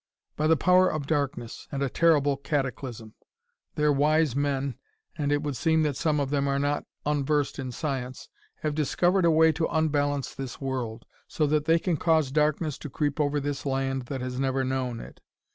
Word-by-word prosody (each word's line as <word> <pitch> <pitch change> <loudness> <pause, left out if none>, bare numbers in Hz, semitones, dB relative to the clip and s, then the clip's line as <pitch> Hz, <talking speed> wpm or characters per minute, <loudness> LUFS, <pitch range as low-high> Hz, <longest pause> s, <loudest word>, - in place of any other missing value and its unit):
"By 155 - +1
the 160 0 +4
power 185 +2 +4
of 155 -2 -3
darkness 140 -6 -2
and 140 -1 -2
a - - +1
terrible 145 -1 +3
cataclysm. 130 -5 -3 0.6
Their 150 0 +3
wise 150 -1 +2
men 140 -1 0 0.4
and 145 -2 -1
it 145 +1 +1
would 145 -2 -2
seem 160 +5 +2
that 150 -3 0
some 150 +1 +1
of 140 -1 -1
them 140 -1 +1
are 140 0 +1
not 145 +1 0 0.2
unversed 145 -1 0
in 130 -1 -4
science 130 -1 -4 0.4
have 150 -1 0
discovered 175 +5 +2
a - - +5
way 160 0 +5
to 160 +1 -1
unbalance 145 -3 0
this 135 -2 -7
world, 125 -4 -4 0.2
so 155 - 0
that 150 0 +1
they 165 +1 +4
can 170 -1 -1
cause 160 -3 +2
darkness 150 0 +1
to 150 - -7
creep 145 +2 -2
over 145 0 +1
this 145 0 -3
land 135 -2 -1
that 135 -1 -4
has 125 0 -4
never 135 0 0
known 130 -2 -2
it. - - -11
145 Hz, 190 wpm, -27 LUFS, 135-155 Hz, 0.6 s, a